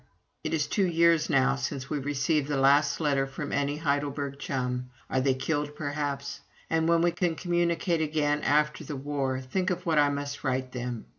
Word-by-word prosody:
It -, -, -2 dB
is 150 Hz, -2 st, +1 dB
two 190 Hz, +5 st, +1 dB
years 165 Hz, -2 st, +3 dB
now 135 Hz, -2 st, +3 dB
since 135 Hz, 0 st, -4 dB
we 150 Hz, -, -2 dB
received 145 Hz, +1 st, 0 dB
the 145 Hz, -2 st, -1 dB
last 140 Hz, +2 st, +4 dB
letter 140 Hz, -3 st, +1 dB
from 140 Hz, +2 st, -6 dB
any 145 Hz, +1 st, 0 dB
Heidelberg 140 Hz, -2 st, -1 dB
chum. 125 Hz, -2 st, -2 dB, 0.2 s
Are 130 Hz, -, +2 dB
they 135 Hz, 0 st, +3 dB
all -, -, -10 dB
killed, 145 Hz, +1 st, -1 dB
perhaps? 145 Hz, -2 st, -3 dB, 0.3 s
And 160 Hz, 0 st, +2 dB
when 170 Hz, 0 st, +4 dB
we 175 Hz, -, +3 dB
can 175 Hz, -1 st, 0 dB
communicate 170 Hz, -1 st, 0 dB
again, 150 Hz, -1 st, +1 dB
after 150 Hz, +1 st, +1 dB
the 150 Hz, 0 st, -5 dB
war, 135 Hz, -1 st, -2 dB
think 180 Hz, +9 st, -1 dB
of 180 Hz, 0 st, -3 dB
what 160 Hz, -3 st, +3 dB
I 145 Hz, -1 st, +5 dB
must 140 Hz, 0 st, -4 dB
write 130 Hz, -1 st, -1 dB
them! 125 Hz, -2 st, -5 dB
145 Hz, 195 wpm, -28 LUFS, 135-160 Hz, 0.3 s, I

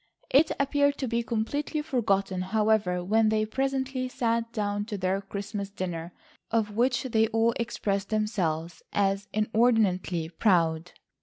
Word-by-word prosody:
It 300 Hz, +4 st, +5 dB
appeared 285 Hz, 0 st, +2 dB
to 265 Hz, -, -2 dB
be 235 Hz, 0 st, 0 dB
completely 285 Hz, +7 st, -2 dB
forgotten, 200 Hz, -9 st, 0 dB
however, 210 Hz, -2 st, +1 dB
when 215 Hz, +4 st, +3 dB
they 215 Hz, 0 st, +1 dB
presently 265 Hz, +2 st, -1 dB
sat 230 Hz, -2 st, -1 dB
down 205 Hz, -2 st, -2 dB
to 210 Hz, -2 st, -4 dB
their 190 Hz, +1 st, 0 dB
Christmas 200 Hz, 0 st, -5 dB
dinner, 175 Hz, -4 st, -5 dB, 0.4 s
of 215 Hz, -2 st, 0 dB
which 245 Hz, +2 st, +2 dB
they 225 Hz, -4 st, +2 dB
all 225 Hz, +1 st, +2 dB
expressed 200 Hz, -4 st, -2 dB
themselves 180 Hz, -7 st, -1 dB
as 200 Hz, 0 st, 0 dB
inordinately 215 Hz, -6 st, +1 dB
proud. 165 Hz, -3 st, +1 dB
215 Hz, 135 wpm, -27 LUFS, 195-235 Hz, 0.4 s, It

